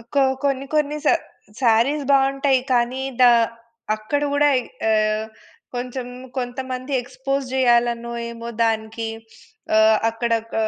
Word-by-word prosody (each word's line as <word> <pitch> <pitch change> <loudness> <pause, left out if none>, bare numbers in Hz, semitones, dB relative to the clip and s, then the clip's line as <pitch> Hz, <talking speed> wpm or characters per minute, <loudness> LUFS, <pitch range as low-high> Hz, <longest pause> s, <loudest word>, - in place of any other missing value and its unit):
ఒక్కో 275 +5 0 0.2
కొన్ని 275 -1 0
కొన్ని 300 0 +1
శ - - +6 0.5
శారీస్ 250 +6 +3
బావుంటాయి. 270 0 +3
కానీ 250 +2 +1 0.2
దా 245 -1 +8 0.6
అక్కడ 215 +7 -2
గూడా 290 0 +4 0.4
ఆహ్, 215 0 +1 0.5
కొంచెం 245 0 -4 0.3
కొంతమంది 255 +2 -4
ఎక్స్పోస్ 275 +1 -3
జేయాలనో, 240 -2 +2 0.2
ఏమో! 235 0 -8 0.2
దానికి 225 0 -2 0.7
ఆహ్, 220 0 +6
అక్కడ 230 +1 -2 0.2
క - - -6
245 Hz, 110 wpm, -22 LUFS, 230-275 Hz, 0.7 s, దా